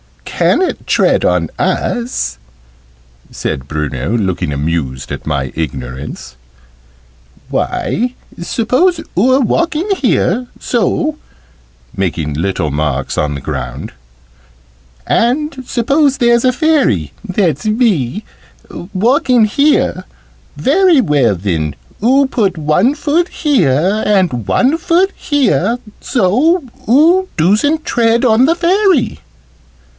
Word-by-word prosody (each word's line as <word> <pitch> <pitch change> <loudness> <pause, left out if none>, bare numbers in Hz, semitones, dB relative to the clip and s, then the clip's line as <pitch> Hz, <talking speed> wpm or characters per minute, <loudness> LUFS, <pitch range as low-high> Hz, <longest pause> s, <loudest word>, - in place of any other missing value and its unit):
"Ca'n't 370 - 0
tread - - +2
on - - +1
us," 240 0 -2 0.9
said 65 0 -4
Bruno, 75 - -2
looking 95 -8 -2
amused 70 -3 -3
at - - -6
my 70 -4 -2
ignorance. 65 -4 -6 1.1
"Why, 245 +3 -2 0.3
suppose 255 - +1 0.2
oo're 255 +8 +3
walking, 335 - 0
here 245 - 0
so 300 +6 -1 0.4
" - - -28
(making 85 -6 -2
little 85 0 -2
marks 70 -2 -2
on 75 -1 -1
the - - -5
ground) 60 +1 -5 1.1
"and 270 +3 0
suppose 275 +3 +1
there's 235 -1 +3
a 255 - +4
Fairy 245 - +1
that's 180 -3 -1
me 215 - 0 0.7
walking 250 - +3
here. 285 +8 +1 0.5
Very 340 +3 +3
well 140 - +2
then, 80 -6 -2 0.3
oo 270 +4 +4
put 210 -9 -1
one 170 - +2
foot 320 +3 0
here, 195 - +1
and 180 - +1
one 280 +6 +2
foot 360 +3 +2
here, 240 - +1 0.2
so 265 - +1 0.3
oo 335 +9 +4
doosn't 220 - +2
tread 235 +1 +1
on 235 +2 +4
the 330 +4 +2
Fairy." 355 - +1
220 Hz, 105 wpm, -14 LUFS, -, 1.1 s, a